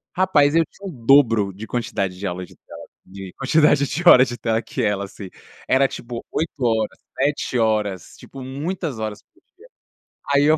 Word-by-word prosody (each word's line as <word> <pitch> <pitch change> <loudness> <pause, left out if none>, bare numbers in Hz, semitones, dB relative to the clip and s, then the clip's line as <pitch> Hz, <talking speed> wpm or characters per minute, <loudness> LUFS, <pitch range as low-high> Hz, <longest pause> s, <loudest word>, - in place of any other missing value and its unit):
Rapaz, 155 -6 +3
eu 165 0 +4
tinha 200 - -15
o - - -7
dobro 115 -8 +4
de 105 +4 -8
quantidade 100 -6 -3
de 100 - -3
aula 90 0 -4
de - - -19
tela - - -13 0.3
de 95 0 -10
quantidade 145 +1 +3
de 170 +6 -3
horas 130 +1 +8
de 120 - -6
tela 115 -1 -1
que - - -5
ela, 105 -2 0
assim. 100 -1 -10 0.4
Era 135 +1 +4
tipo 120 -2 -8
8 160 -2 -3
horas, 110 -2 0 0.2
7 140 -2 0
horas, 105 -5 -1
tipo, 135 - -11
muitas 145 +1 -4
horas 110 -1 -5
por - - -77 0.8
dia. - - - 0.2
Aí 140 0 +4
eu 155 +1 +4
120 Hz, 185 wpm, -21 LUFS, 105-145 Hz, 0.8 s, horas